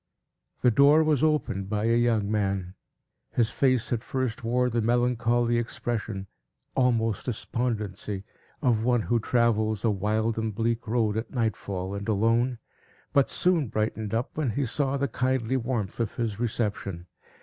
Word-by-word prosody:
The 125 - +5
door 145 +6 +6
was 155 -3 +2
opened 145 -11 0
by 105 0 -1
a 115 +1 +3
young 115 -4 +2
man. 95 -3 -1 0.6
His 115 -2 +2
face 130 -3 +2
at 115 - -1
first 130 -4 -2
wore 125 +2 +2
the 120 -1 0
melancholy 120 0 +2
expression, 115 -4 -3 0.5
almost 115 -4 +1
despondency, 105 -4 -3 0.4
of 115 -4 +2
one 120 -2 +2
who 120 -1 +1
travels 110 -3 +1
a 110 - +4
wild 110 +3 0
and 110 -2 -2
bleak 115 +1 -1
road, 110 -2 +1
at 110 - -3
nightfall 100 -5 -2
and 100 +2 -4
alone, 115 +4 +2 0.6
but 140 -1 +4
soon 175 -6 +2
brightened 110 -1 -2
up, 115 +2 -2
when 150 -4 0
he 135 +6 -1
saw 135 +3 0
the 140 0 0
kindly 130 0 0
warmth 120 -6 -2
of 115 -3 -2
his 110 -3 -2
reception. 105 -6 -2
115 Hz, 150 wpm, -27 LUFS, 110-125 Hz, 0.6 s, door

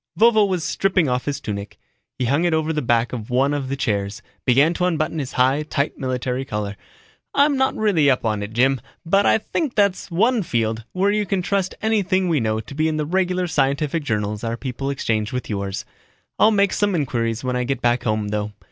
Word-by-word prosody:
Vovo 220 0 +5
was 185 -4 -1
stripping 185 +1 +1
off 125 +1 -1
his 145 -1 -2
tunic. 100 -1 -6 0.4
He 125 - -1
hung 140 +7 +2
it 170 -2 +2
over 160 0 0
the 150 - -1
back 120 -1 +1
of 110 -3 -5
one 135 +3 +2
of 140 -3 -3
the 140 - -1
chairs, 105 -6 -2 0.2
began 140 +6 +4
to 180 +1 0
unbutton 160 -2 0
his 135 -3 -4
high, 130 +3 +3
tight 150 -1 -2
military 130 0 -2
collar. 105 -5 -4 0.6
"I'm 285 +1 +4
not 265 0 +1
really 185 -10 +3
up 130 -3 +1
on 105 -2 0
it, 100 +1 -5
Jim, 130 +2 +2 0.2
but 195 +4 +3
I - - +5
think 265 +5 -3
that's 200 -3 +1
one 225 +7 +2
field 115 - -1
where 195 +2 +2
you 210 -1 0
can 190 -1 0
trust 195 0 -1
anything 195 -4 +1
we 160 -3 +2
know 110 -1 0
to 110 - -9
be 155 +2 +1
in 155 -1 -1
the 150 - -1
regular 180 +2 0
scientific 150 0 0
journals 105 -3 -2
our 115 0 -2
people 135 +2 -4
exchange 110 -5 -1
with 125 -2 -4
yours. 100 -1 -3 0.5
I'll 215 - +6
make 200 -3 +2
some 205 -2 +1
inquiries 115 -6 -1
when 125 -1 -1
I 125 - 0
get 130 0 -2
back 120 0 +2
home, 110 -2 -1
though. 105 0 -2
140 Hz, 215 wpm, -22 LUFS, 115-180 Hz, 0.6 s, I'll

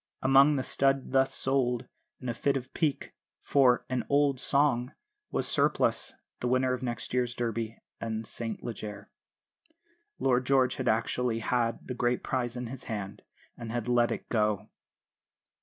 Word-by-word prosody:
Among 135 +3 +6
the 130 - 0
stud 135 0 +1
thus 135 0 +3
sold, 130 -2 0 0.3
in 125 - -7
a 120 - 0
fit 140 +4 +1
of 130 0 -8
pique, 155 -5 -1 0.3
for 130 -3 +4
"an 130 -1 -1
old 140 -2 +3
song" 135 -3 +1 0.4
was - - -1
Surplice, - - +1 0.2
the 125 - -1
winner 130 +1 +2
of 125 - -2
the 130 - -4
next 120 0 -4
year's 125 -1 0
Derby 115 -1 -2 0.2
and 110 0 -3
St 115 +1 -5
Leger. 105 -3 -7 1.1
Lord 125 -1 +1
George 130 -2 +3
had - - -3
actually 115 +1 +1
had 115 0 -1
the 125 - -3
great 120 0 0
prize 125 -2 -2
in 125 - -4
his 125 +2 -8
hand 100 -3 -5 0.3
and 115 -1 -7
had 120 -1 -3
let 120 -1 +3
it - - -4
go! 105 -3 0
125 Hz, 160 wpm, -29 LUFS, 115-130 Hz, 1.1 s, Among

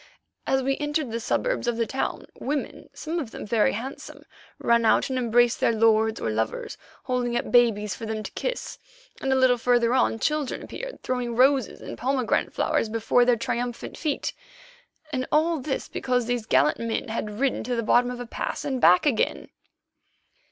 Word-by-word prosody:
As 265 0 +2
we 270 +1 0
entered 295 -3 -1
the 230 - -2
suburbs 380 - -1
of 240 -1 0
the 230 - +1
town, 265 - -3
women, 285 +1 -4
some 325 +2 -4
of 275 -8 -4
them - - -8
very 215 0 +2
handsome, 255 +6 -7 0.3
ran 235 0 +2
out 225 - +3
and 260 - 0
embraced 240 0 +3
their - - +2
lords 220 0 +3
or 110 - -2
lovers, 110 +1 -2 0.3
holding 245 -1 -1
up - - -3
babies 215 -4 +3
for 225 - -7
them 215 -1 -3
to - - -7
kiss, - - -4 0.4
and 270 - 0
a - - +4
little 260 -2 +4
farther 240 0 +3
on 255 -3 +2
children 300 +3 -1
appeared, - - -8
throwing 250 -2 -2
roses 260 -1 +3
and - - -8
pomegranate 260 -1 0
flowers 225 - 0
before 230 +2 +2
their 245 -1 +3
triumphant 240 +1 -3
feet. 305 -3 -2 0.8
And 255 -1 -1
all 320 +1 +2
this 270 0 -3
because 250 -2 -1
these 240 -2 -2
gallant - - +3
men 230 +1 -2
had 215 -1 -4
ridden 275 -1 0
to 250 0 -1
the 230 - -1
bottom 245 +3 +3
of 250 0 -6
a 245 - -5
pass 235 - -4
and 265 -3 -2
back 180 +5 +6
again! 265 -7 0
245 Hz, 185 wpm, -25 LUFS, 230-265 Hz, 0.8 s, back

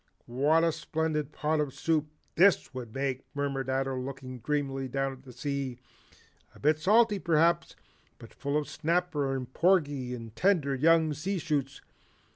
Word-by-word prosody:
What 145 +7 +2
a 165 - +3
splendid 155 -2 -2
pot 155 +1 0
of 145 -3 -2
soup 155 -2 0 0.3
THIS 175 -8 +4
would 125 -3 -7
make," 135 +1 -2
murmured 140 -2 -2
Ato 135 0 0
looking 130 -1 -6
dreamily 135 +1 -2
down 135 +1 -1
at 130 - -14
the 130 -1 -13
sea, 135 0 -3 0.8
"a - - -15
bit 155 +2 +2
salty, 210 +4 +4
perhaps, 170 0 +2 0.4
but - - -13
full 140 +1 -2
of 150 - -2
snapper 160 -4 0
and 130 -1 -6
porgy 145 -9 +2
and 115 -2 -10
tender 165 - +2
young 160 +3 +4
sea 185 +7 -2
shoots. 145 -5 -2
145 Hz, 155 wpm, -29 LUFS, 135-160 Hz, 0.8 s, THIS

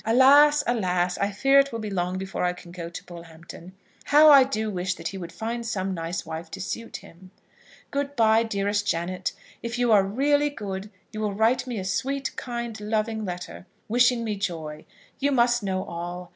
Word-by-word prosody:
Alas, 280 +6 +6
alas! 180 -6 0
I 200 - +1
fear 270 +7 +4
it 275 0 +2
will 230 - -4
be 215 -2 -5
long 180 -1 -1
before 190 0 -4
I 180 0 +1
can 180 -1 -13
go 170 -1 -7
to 170 - -8
Bullhampton. 170 +1 -12 0.3
How 300 +1 +7
I 275 -2 +9
do 220 -5 -2
wish 185 0 -2
that 165 -1 -5
he 195 - -7
would 170 -2 -7
find 235 +1 -4
some 195 -4 -2
nice 165 0 -4
wife 160 +1 -6
to 195 - -7
suit 230 +4 -5
him! 185 +2 -16 0.6
Good 285 0 -2
bye, 225 -2 +4
dearest 205 -2 -1
Janet. 180 +1 -1 0.3
If 235 +1 -4
you 245 -1 +2
are 205 -2 +7
really 285 +8 +2
good, 205 -6 -6 0.2
you 215 - -6
will 210 -2 -1
write 245 +4 +2
me 245 -3 -4
a 190 - -4
sweet, 270 +8 -2
kind, 235 -3 -5
loving 215 +1 -1
letter, 180 0 -7 0.2
wishing 245 +1 +3
me 215 -2 -2
joy. 160 -5 -5 0.3
You 280 +1 +1
must 240 -2 +3
know 190 -2 -2
all. 175 +1 -6
210 Hz, 195 wpm, -25 LUFS, 180-240 Hz, 0.6 s, I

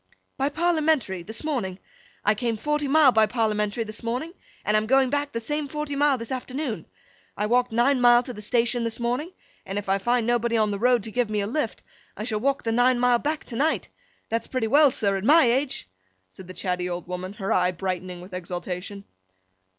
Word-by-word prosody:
'By 275 +1 0
Parliamentary, 310 - +1
this 220 - -6
morning. 235 -12 -2 0.5
I 210 - +5
came 230 +1 -2
forty 295 +4 -1
mile 290 -1 +6
by 220 -2 +4
Parliamentary 215 -1 0
this 215 0 -7
morning, 250 +9 -3 0.3
and 210 - +2
I'm 215 0 +2
going 265 +1 +3
back 285 0 -1
the 230 - -3
same 295 +5 -2
forty 300 0 -4
mile 285 -1 +3
this 230 0 -7
afternoon. 260 -1 -4 0.5
I 210 - 0
walked 245 +2 +2
nine 245 +3 +2
mile 240 0 +6
to 250 - -7
the 210 - -9
station 235 +2 +1
this 230 0 -3
morning, 250 +8 -2 0.3
and 195 +1 -5
if 205 - -4
I 195 +1 +2
find 240 +3 +1
nobody 235 -1 +1
on 215 -1 +2
the 200 - -3
road 245 -1 +3
to 220 - -6
give 245 -1 0
me 210 -1 -1
a - - -1
lift, 295 +9 -3 0.3
I 210 - -4
shall 215 -2 -1
walk 275 +4 0
the 225 - -1
nine 245 +2 +3
mile 245 -1 +4
back 300 +3 -2
to 235 - -8
night. 305 +6 0 0.4
That's 230 0 -2
pretty 255 -3 -1
well, 285 +6 +6
sir, 200 -6 0
at 190 - -5
my 305 +5 +6
age!' 270 - -1 0.4
said 185 - -11
the 185 - -9
chatty 180 -1 -2
old 175 -1 -4
woman, 180 +1 -5
her 195 -2 -2
eye 180 0 +3
brightening 185 0 -4
with 185 +1 -12
exultation. 180 +2 -5
235 Hz, 210 wpm, -25 LUFS, 205-270 Hz, 0.5 s, mile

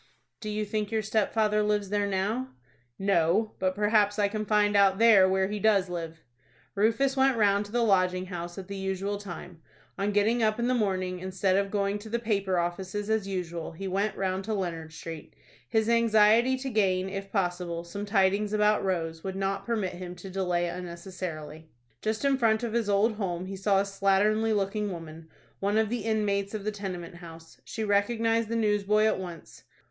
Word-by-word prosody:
"Do 215 - -5
you 210 0 -2
think 210 0 -2
your 220 -1 -1
stepfather 215 0 +1
lives 210 -1 0
there 205 0 0
now?" 210 +7 -2 0.4
"No; 195 +2 +2
but 185 0 0
perhaps 210 0 +2
I 205 -1 +3
can 215 0 -4
find 210 -1 +3
out 195 -1 +5
there 215 -4 +6
where 190 0 +2
he 210 +1 -4
does 200 -3 +3
live." 165 -2 -6 0.5
Rufus 230 +7 +2
went 265 -2 +3
round 205 -1 +3
to - - -14
the 240 +1 +1
Lodging 185 -3 +2
House 175 -1 -6
at 190 -2 -7
the 200 - -6
usual 195 +1 -3
time. 175 -3 -9 0.4
On 200 +1 0
getting 215 +4 +2
up 215 -1 +2
in 235 0 0
the 255 - +2
morning, 185 -5 -1
instead 185 +1 0
of 200 0 +1
going 200 0 -1
to 220 +2 -10
the 235 - 0
paper 200 -5 0
offices 190 +4 -2
as 220 -3 0
usual, 170 -4 -4
he 195 +4 -6
went 200 +3 -1
round 190 0 -1
to 220 0 -1
Leonard 165 -5 -4
Street. 165 -1 -9 0.3
His 220 -2 +1
anxiety 230 +2 +4
to 265 +1 -4
gain, 190 -4 +1
if 195 0 -6
possible, 175 -3 -2
some 200 +4 -6
tidings 200 +1 +2
about 210 0 +3
Rose 165 -4 -2
would 190 -1 -4
not 195 +1 -2
permit 210 -6 -1
him 180 0 -7
to 185 +2 -10
delay 180 -2 0
unnecessarily. 170 -3 -7 0.3
Just 220 +5 -2
in 275 -1 +2
front 220 -1 +2
of 230 -2 -2
his 230 -3 0
old 210 +2 +2
home 180 -4 -3
he 195 +1 -6
saw 195 0 +2
a - - +2
slatternly 200 +3 +2
looking 205 +1 -1
woman, 165 -2 -9 0.3
one 200 +2 +1
of 220 -1 +2
the 230 -2 -3
inmates 205 -2 0
of 210 - -4
the 215 - -1
tenement 185 -4 -6
house. 165 -2 -13
She 220 - -4
recognized 225 +2 +1
the 230 - -1
newsboy 210 -1 +2
at 215 -3 +2
once. 175 -3 -9
200 Hz, 195 wpm, -28 LUFS, 185-215 Hz, 0.5 s, there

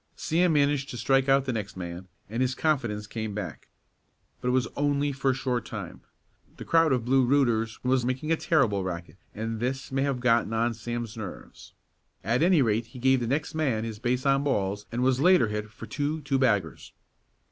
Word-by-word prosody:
Sam 170 +1 +1
managed 145 -2 +2
to 120 - -6
strike 135 +2 +2
out 135 0 +4
the 130 - -1
next 105 -4 -5
man, 90 +1 -6 0.2
and 115 +4 -3
his 130 0 +1
confidence 120 -10 0
came 110 -1 -5
back. 105 - -6 0.7
But - - -3
it - - +3
was 125 -1 +2
only 145 0 +1
for 135 0 -1
a - - +3
short 125 -3 -1
time. - - -7 0.6
The - - -8
crowd 165 -2 +4
of 125 -3 +1
Blue 130 +1 +4
"rooters" 120 -4 +2
was 130 0 +2
making 130 +5 -2
a - - +5
terrific 135 - +1
racket 85 -2 -6 0.2
and 110 +1 -3
this 130 +3 -3
may 135 0 0
have 135 -2 0
gotten 115 -2 +2
on 115 +1 +1
Sam's 120 0 -5
nerves, 110 -4 -9 0.5
at 115 +7 +1
any 170 -4 +5
rate 115 0 0
he 120 - -13
gave 130 +1 +3
the 120 - -2
next 145 +5 -1
man 135 -9 0
his 110 -2 -5
base 125 +3 -1
on 135 0 +3
balls 100 -7 -1
and 120 +2 -1
was 130 0 +2
later 175 - +5
hit 105 0 -4
for - - -10
two 150 +2 -2
two 135 -1 0
baggers. 100 - 0
125 Hz, 200 wpm, -27 LUFS, 110-140 Hz, 0.7 s, a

